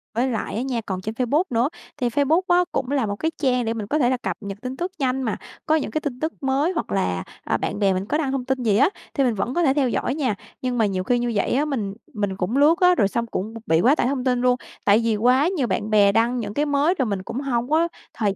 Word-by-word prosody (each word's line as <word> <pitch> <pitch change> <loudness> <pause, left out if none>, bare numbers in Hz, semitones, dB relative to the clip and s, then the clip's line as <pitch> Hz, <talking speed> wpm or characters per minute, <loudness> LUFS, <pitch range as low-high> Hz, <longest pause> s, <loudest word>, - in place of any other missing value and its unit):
Với 250 +3 +2
lại 230 -4 -3
á 230 - -1
nha, 255 -3 -2
còn 185 -1 -3
trên 220 +4 -5
Facebook 270 +8 +2
nữa, 240 +3 +1 0.3
thì 245 -4 0
Facebook 290 +7 +2
á 355 0 +4
cũng 270 -3 -2
là 275 -5 +1
một 205 0 -2
cái 320 +8 -1
trang 250 -4 +2
để 225 - 0
mình 215 -3 -5
có 305 +5 0
thể 245 -2 +3
là 255 - +1
cập - - -4
nhật 200 -1 -6
tin 255 +1 -5
tức 355 +2 -3
nhanh 265 0 0
mà, 225 -4 -1 0.3
có 310 - +3
những 310 - -1
cái 310 - -1
tin 260 -5 -4
tức 315 +1 -2
mới 275 +6 +1
hoặc 320 - -3
là, 90 - 0 0.2
à, - - 0
bạn - - -3
bè 195 -2 +3
mình 185 +2 -2
có 300 - 0
đăng 280 -4 -1
thông 265 -2 -2
tin 265 -1 -1
gì 210 -3 +3
á, 280 - +5 0.2
thì 275 - +1
mình 245 -3 +2
vẫn 235 +6 -2
có 345 - +1
thể 270 -4 +4
theo 275 -3 +1
dõi 255 +3 -1
nha. 255 -9 0 0.3
Nhưng 250 -1 -1
mà 225 - +3
nhiều 190 -2 -1
khi 245 +4 +1
như 240 0 -1
vậy 200 - +1
á, 295 +3 +2
mình 220 -9 -2 0.2
mình 205 -4 -2
cũng 200 +8 -1
lướt 310 +5 +5
á, 360 -1 +5
rồi 200 - +3
xong 235 +4 -2
cũng 215 +1 -4
b - - -7
bị 160 +1 +4
quá 270 +5 +5
tải 245 - +1
thông 265 -1 -1
tin 250 -1 +1
luôn, 250 0 +4 0.3
tại 205 +3 +5
vì 225 -2 +1
quá 250 +7 +3
nhiều 255 -5 +1
bạn 205 +2 -2
bè 205 -2 +5
đăng 235 +3 +2
những 205 -2 -4
cái 295 +4 +1
mới 290 +4 +2
rồi 260 - +2
mình 200 -3 -2
cũng 245 - -5
hông 245 -3 -1
có 325 +2 +3 0.3
thời 205 -3 0
250 Hz, 300 wpm, -23 LUFS, 215-280 Hz, 0.3 s, á